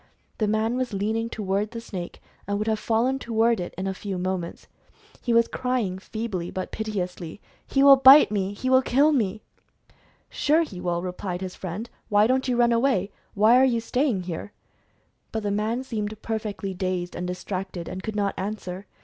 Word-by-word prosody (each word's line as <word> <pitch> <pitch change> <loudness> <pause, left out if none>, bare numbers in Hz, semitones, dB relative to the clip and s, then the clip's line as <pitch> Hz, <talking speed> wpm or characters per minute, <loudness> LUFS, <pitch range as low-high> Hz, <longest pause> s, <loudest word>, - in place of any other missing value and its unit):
The 215 - +1
man 220 +3 +1
was 255 -3 -2
leaning 220 +3 -1
to 220 - -6
ward 200 +2 0
the 230 - -6
snake, 185 -6 -7 0.3
and 200 0 0
would 210 - -2
have 220 -1 0
fallen 240 +5 +1
toward 230 -2 +1
it 175 - -4
in 190 - -3
a 195 - -1
few 195 0 -5
moments. 180 -1 -4 0.5
He 240 - -1
was 230 0 +4
crying, 245 -8 -2
feebly, 200 -4 -4
but 185 - -5
piteously, 185 -5 -4 0.3
"He 270 - +2
will 280 -1 +9
bite 265 -1 +8
me! 200 -1 -1
He 230 +5 -5
will 260 0 +5
kill 280 +4 +3
me 215 -7 0 0.4
!" - - -33
"Sure, 315 +3 +3
he 190 - -8
will," 175 0 -1
replied 180 0 -4
his 185 -1 -5
friend, 190 +5 -6 0.2
"why 205 0 +5
don't 260 +3 +1
you 250 -1 +1
run 240 0 +4
away? 230 -5 +2 0.2
Why 215 +4 +6
are - - +5
you 245 -3 +3
staying 235 -3 0
here 175 -2 -5
?■" - - -15 0.8
But 220 -1 -3
the 205 - -1
man 220 +5 -1
seemed 215 -4 -4
perfectly 210 -3 -3
dazed, 180 -1 -3
and 180 +1 -3
distracted, 185 -1 -5
and 185 - -5
could 220 +2 -5
not 200 -1 0
answer. 190 -1 -5
210 Hz, 195 wpm, -25 LUFS, 190-235 Hz, 0.8 s, will